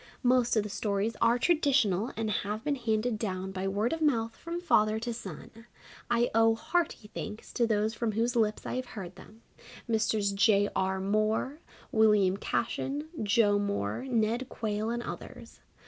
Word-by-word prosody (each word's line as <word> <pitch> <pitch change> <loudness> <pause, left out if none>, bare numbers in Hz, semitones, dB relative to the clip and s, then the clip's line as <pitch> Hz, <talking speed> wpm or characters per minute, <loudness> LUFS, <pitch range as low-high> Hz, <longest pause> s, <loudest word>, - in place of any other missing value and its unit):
Most 250 -1 +3
of 215 - +3
the 210 - -6
stories 205 +2 -1
are 235 +1 +4
traditional 255 - +2
and 220 -1 -1
have 210 +2 -2
been 295 0 0
handed 225 -2 -1
down 190 -3 -3
by 190 0 -3
word 205 +6 0
of 325 - -4
mouth 230 -7 +1
from 335 +1 -5
father 215 -11 +3
to 235 +1 -3
son. 225 +2 -10 0.4
I 240 0 +2
owe 225 0 +4
hearty 280 -4 -2
thanks 215 0 -7
to 235 -2 +2
those 215 0 +1
from 225 -1 -2
whose 235 +3 0
lips 215 -2 +1
I - - -3
have 255 -1 -4
heard 185 -2 -6
them 215 +4 -15 0.4
Messrs. 220 -3 +1
J. 205 0 +3
R. 190 0 0
Moore, 215 +8 0 0.3
William 210 -4 +4
Cashen, 280 +8 -2
Joe 205 -1 +3
Moore, 200 - -2
Ned 235 +1 0
Quayle 215 0 -2
and 240 0 -2
others. - - -9
220 Hz, 165 wpm, -29 LUFS, 205-240 Hz, 0.4 s, are